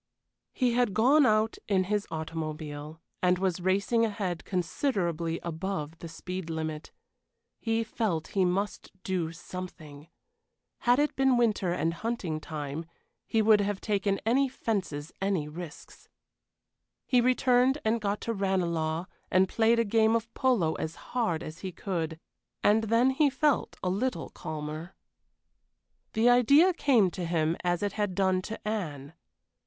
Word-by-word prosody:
He 250 -3 +1
had 240 -5 +1
gone 265 +5 +5
out 215 +1 +2
in 190 -2 +2
his 205 +2 -1
automobile, 155 -1 -5 0.2
and 180 0 +3
was 185 -1 -1
racing 200 +5 +2
ahead 200 -6 -2
considerably 175 - -1
above 165 -2 -4
the 170 - -7
speed 180 +2 -6
limit. 160 -1 -4 0.7
He 225 0 0
felt 215 -8 -2
he 195 - +1
must 190 +3 -1
do 175 -4 -1
something. 165 -4 -9 0.7
Had 245 +1 +3
it 295 +1 +1
been 265 -2 +3
winter 215 -6 +2
and 165 -1 0
hunting 185 -5 -3
time, 155 +1 -5 0.4
he 220 -1 +2
would 210 -1 +6
have 205 -1 -1
taken 200 -2 0
any 265 +4 +3
fences 185 - -3
any 195 -6 0
risks. 155 0 -10 1.0
He 250 -2 +3
returned 255 +1 +3
and 225 +1 +1
got 205 0 -1
to 230 - -2
Ranelagh, 170 -5 0 0.2
and 185 +1 +4
played 225 +3 +3
a 230 - +2
game 220 +1 +3
of 230 0 -2
polo 220 -12 +2
as 160 +1 -4 0.2
hard 220 -10 0
as 155 +2 -8
he 185 0 -5
could, 165 -4 -3 0.4
and 220 +2 +4
then 230 +4 +3
he 285 +2 +3
felt 280 +1 +1
a 180 - +1
little 200 -3 -2
calmer. 155 +3 -6 1.2
The 225 +2 +3
idea 280 +9 +6
came 245 - +3
to 180 - -5
him 165 -1 +1
as 175 +1 0
it 205 - 0
had 205 -4 -1
done 190 -1 +2
to 220 +2 -7
Anne. 155 -9 -4
190 Hz, 145 wpm, -29 LUFS, 165-225 Hz, 1.2 s, would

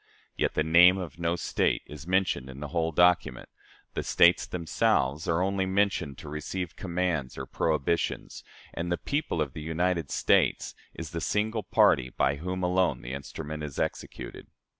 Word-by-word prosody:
Yet - - -1
the 75 - +2
name 90 +4 +6
of 90 -2 -7
no 85 0 0
State - - 0
is 75 +1 -10
mentioned 90 -8 0
in 65 +1 -9
the 75 0 -6
whole 80 0 0
document; 90 +2 +2 0.5
the - - -2
States 85 +1 +4
themselves 80 -3 0
are 85 +2 +2
only 95 0 0
mentioned 95 -8 0
to - - -10
receive 80 +3 -5
commands 85 -7 -2
or - - -4
prohibitions; 80 +1 -1 0.3
and 85 +1 -3
the 85 - +1
'people 145 - -1
of 70 -3 -9
the 75 - -7
United 85 -1 -1
States' - - +2 0.2
is 80 -2 -7
the 85 - -4
single 110 +5 0
party 65 -8 +3
by 70 +2 0
whom 90 +4 -4
alone 90 -3 +1
the - - -6
instrument 75 +2 -6
is 75 -2 -6
executed. - - -5
85 Hz, 165 wpm, -28 LUFS, 75-90 Hz, 0.5 s, name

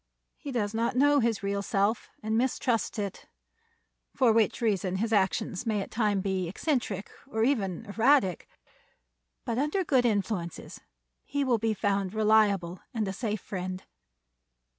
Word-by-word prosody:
He 290 - -7
does 215 -4 -1
not 230 +2 0
know 290 +2 +5
his 230 -4 0
real 200 0 -1
self, 200 +3 0
and 220 +1 -1
mistrusts 240 -1 0
it; 200 -2 -4 0.9
for 240 -4 +4
which 220 -1 +2
reason 195 -5 0
his 220 +4 -1
actions 195 +1 0
may 215 -2 +1
at 195 - -5
times 210 -4 +1
be 190 -3 -1
eccentric, 205 - -2 0.2
or 220 -5 -1
even 225 -6 0
erratic. 220 - +2 1.0
But 230 - -1
under 300 +7 0
good 260 -7 +3
influences 200 -6 -3 0.4
he 285 +1 -1
will 245 -4 +2
be 220 0 0
found 200 -1 -1
reliable 205 -5 +3 0.2
and 215 -3 0
a 190 - -3
safe 215 -1 -3
friend. 185 -1 -5
215 Hz, 145 wpm, -28 LUFS, 195-235 Hz, 1.0 s, know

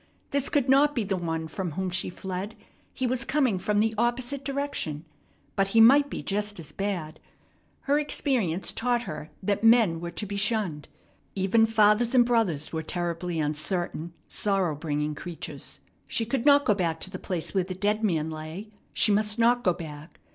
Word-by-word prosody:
This 280 -1 0
could 280 -3 +1
not 285 +3 +4
be 235 - +1
the 195 -1 -1
one 165 -2 -3
from 170 +1 -4
whom 190 +2 -2
she 180 +1 0
fled. 190 +4 -5 0.4
He 260 - -3
was 255 +1 0
coming 265 -9 +1
from 205 +3 0
the 220 +1 +2
opposite 245 +3 -1
direction, 275 - -3 0.5
but 195 0 +2
he 225 +3 +2
might 280 +6 +7
be - - -5
just 205 0 -2
as 155 -2 -9
bad. 175 -5 -4 0.6
Her 285 +1 +2
experience 225 - -1
taught 240 0 0
her 155 -5 -7
that 200 +2 0
men 225 -8 +5
were 170 - -4
to 170 +4 -5
be 200 0 -4
shunned. 200 -8 0 0.5
Even 200 +4 +3
fathers 220 +2 +3
and 245 -1 +6
brothers 210 -13 0
were 160 - -1
terribly 175 0 -3
uncertain, 160 +2 -2
sorrow 195 -5 +1
bringing 150 0 -2
creatures. 170 +2 -7 0.3
She 225 - -1
could 255 +3 -1
not 285 0 +6
go 210 - +4
back 170 -5 -1
to 190 - -2
the 185 - -6
place 175 -4 -3
where 190 -2 +2
the 185 0 -5
dead 210 +3 0
man 160 -6 0
lay. 160 +7 -7 0.2
She 215 - +4
must 210 +1 +2
not 240 +1 +3
go 180 - +4
back. 155 -1 -10
200 Hz, 185 wpm, -27 LUFS, 170-235 Hz, 0.6 s, might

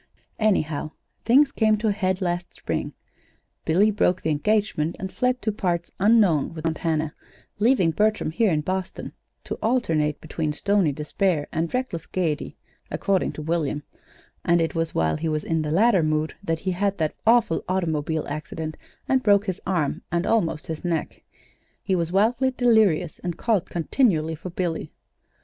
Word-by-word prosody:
"Anyhow, 155 -8 0 0.3
things 275 +4 +5
came 215 -4 +2
to 220 +1 0
a - - +3
head 190 -2 -1
last 175 0 -2
spring, - - -3 0.7
Billy 195 +7 +4
broke 185 -3 +1
the 160 - +1
engagement 175 -1 0
and 190 0 -6
fled 250 0 0
to 215 - +1
parts 175 -4 -2
unknown 195 -8 +3
with 160 0 -6
Aunt 160 -1 -1
Hannah, 160 -2 -1 0.5
leaving 215 -7 +3
Bertram 215 -1 +1
here 215 +6 +2
in 155 -2 +1
Boston 185 +3 -4 0.3
to - - -5
alternate 160 - +1
between 155 -1 -3
stony 195 0 +2
despair 150 +2 -1
and 165 +1 -1
reckless 250 -10 -3
gayety, 165 -5 -2 0.3
according 195 -2 0
to 155 - -7
William; 155 -2 -1 0.6
and 170 0 +3
it 165 -1 0
was 165 -1 -2
while 80 - +1
he 160 +1 -2
was 155 -1 -1
in 160 -1 0
the 150 - -2
latter 195 +4 +4
mood 155 0 0
that 165 -3 -2
he 190 - -1
had 200 +2 0
that 155 -2 0
awful 230 -8 +4
automobile 160 -4 -1
accident 155 +1 -5 0.3
and 265 -1 +3
broke 205 -2 +4
his 190 -3 -3
arm 170 -7 0
and 170 +1 0
almost 165 -9 +1
his 160 -1 -6
neck. 170 -3 -2 0.6
He 195 - 0
was 170 -1 -1
wildly 230 +7 +3
delirious, 220 -10 +2
and 175 -2 -4
called 220 -7 +1
continually 165 - +1
for 160 +4 -7
Billy. 170 -3 -3
175 Hz, 165 wpm, -24 LUFS, 160-210 Hz, 0.7 s, things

